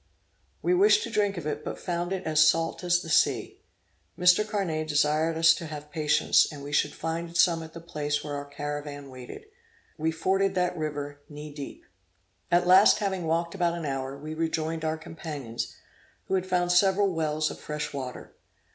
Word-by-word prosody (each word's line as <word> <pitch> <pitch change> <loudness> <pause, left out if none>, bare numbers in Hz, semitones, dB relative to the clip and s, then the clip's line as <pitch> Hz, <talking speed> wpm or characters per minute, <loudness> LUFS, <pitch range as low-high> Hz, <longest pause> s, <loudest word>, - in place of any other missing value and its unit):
We 360 - +3
wished 415 +4 +5
to - - -5
drink 205 -2 +1
of 170 - -5
it, 150 -1 -3
but - - -5
found 175 0 -3
it 190 -1 -2
as 155 -1 +1
salt 165 +3 +3
as 175 0 +2
the - - -9
sea. 160 - +1 0.6
Mr. 180 +3 +5
Carnet 190 -8 -2
desired 155 +2 +2
us 165 0 +7
to 170 - -6
have 150 -1 -8
patience, 150 -1 +3
and 145 -2 -9
we 145 - -7
should 145 0 +1
find 165 +1 -4
some 170 -3 +4
at 160 0 -10
the 165 - -9
place 150 -3 -2
where 145 -1 -5
our 145 0 -4
caravan 145 -1 -6
waited. 130 - -10 0.5
We 160 +1 +1
forded 190 +4 +1
that 180 -1 +1
river 145 -2 -4
knee 150 0 -9
deep. 145 -2 -8 0.6
At 175 0 +3
last, 185 +3 +7
having 190 -5 -2
walked 170 +1 0
about 175 -3 0
an 165 - -5
hour, 135 -1 -3
we 155 +2 -7
rejoined 160 0 -2
our 160 0 -1
companions, 150 -7 -6 0.5
who - - -4
had 185 -1 0
found 175 -1 +1
several 190 +1 +3
wells 155 -1 0
of - - -9
fresh 150 -1 -5
water. 130 -3 -6
160 Hz, 185 wpm, -27 LUFS, 150-175 Hz, 0.6 s, us